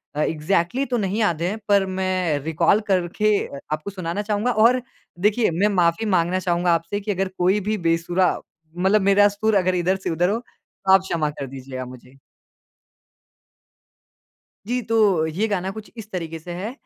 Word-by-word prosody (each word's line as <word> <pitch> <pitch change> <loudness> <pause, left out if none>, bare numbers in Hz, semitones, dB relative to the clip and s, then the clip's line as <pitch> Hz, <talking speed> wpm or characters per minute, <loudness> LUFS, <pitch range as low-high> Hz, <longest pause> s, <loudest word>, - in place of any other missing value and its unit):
अ, 150 - 0
exactly 170 - 0
तो 245 -2 -1
नहीं 200 -1 -1
याद 170 -7 +1
हैं 190 +6 -1
पर 200 -2 +4
मैं 185 -5 0
रिकॉल 160 +6 +2
करके 190 +3 +1 0.4
आपको 155 +6 -4
सुनाना 185 +1 -3
चाहूँगा 210 +3 0
और 250 +2 +5 0.4
देखिए, 210 +3 +2
मैं 180 +6 +2
माफ़ी 175 +4 +2
माँगना 180 -2 +1
चाहूँगा 175 -1 +1
आपसे 170 +5 -1
की 210 +1 -3
अगर 195 -1 -1
कोई 185 +3 +2
भी 215 - 0
बेसुरा 170 +1 +1 0.5
मतलब 195 +4 +3
मेरा 205 +1 +6
सुर 205 +1 0
अगर 185 -1 +2
इधर 180 +2 +1
से - - 0
उधर 175 +2 +1
हो 215 +3 0
तो 195 -5 -3
आप 190 - +7
क्षमा 165 -5 -1
कर 145 -2 -6
दीजिएगा 130 -1 -7
मुझे। 125 +1 -13 2.5
जी, 250 +2 -1
तो 210 -7 +2
ये 175 +8 -1
गाना 190 -2 -1
कुछ 215 +2 -9
इस 220 -2 -9
तरीके 165 -3 -4
से 175 +2 -8
है 200 +6 -4
185 Hz, 170 wpm, -22 LUFS, 170-205 Hz, 2.5 s, आप